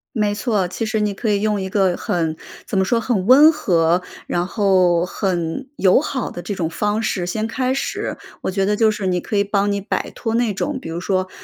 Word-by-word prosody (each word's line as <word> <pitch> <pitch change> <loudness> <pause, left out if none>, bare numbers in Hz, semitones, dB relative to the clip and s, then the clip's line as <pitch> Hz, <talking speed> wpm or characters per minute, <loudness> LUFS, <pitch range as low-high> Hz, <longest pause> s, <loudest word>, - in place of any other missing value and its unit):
没 210 -2 +1
错， 210 -5 0
其 220 +5 -4
实 220 0 -1
你 210 -1 0
可 220 +3 -3
以 200 -1 +1
用 210 -2 0
一 190 - -4
个 190 -3 +2
很 160 -2 -1 0.3
怎 220 - -2
么 190 - +4
说， 230 +5 +1
很 215 -6 -1
温 285 +5 +8
和， 175 - +2 0.3
然 175 0 0
后 185 -4 +2
很 180 +7 -2
友 190 +4 +4
好 270 -4 -3
的 175 - -7
这 175 +4 -4
种 170 -4 -2
方 210 +5 -1
式 190 -5 -1
先 215 +5 -2
开 255 +2 -1
始。 270 - -3 0.2
我 - - -2
觉 195 0 0
得 210 +1 +1
就 220 0 +3
是 205 -3 -3
你 180 -1 0
可 210 - -2
以 200 - +4
帮 200 0 0
你 200 - -1
摆 200 - -3
脱 225 -1 -3
那 235 -3 +1
种， 275 +8 -2
比 - - -7
如 165 +1 -4
说， 185 0 -1
200 Hz, 245 characters per minute, -20 LUFS, 185-220 Hz, 0.3 s, 温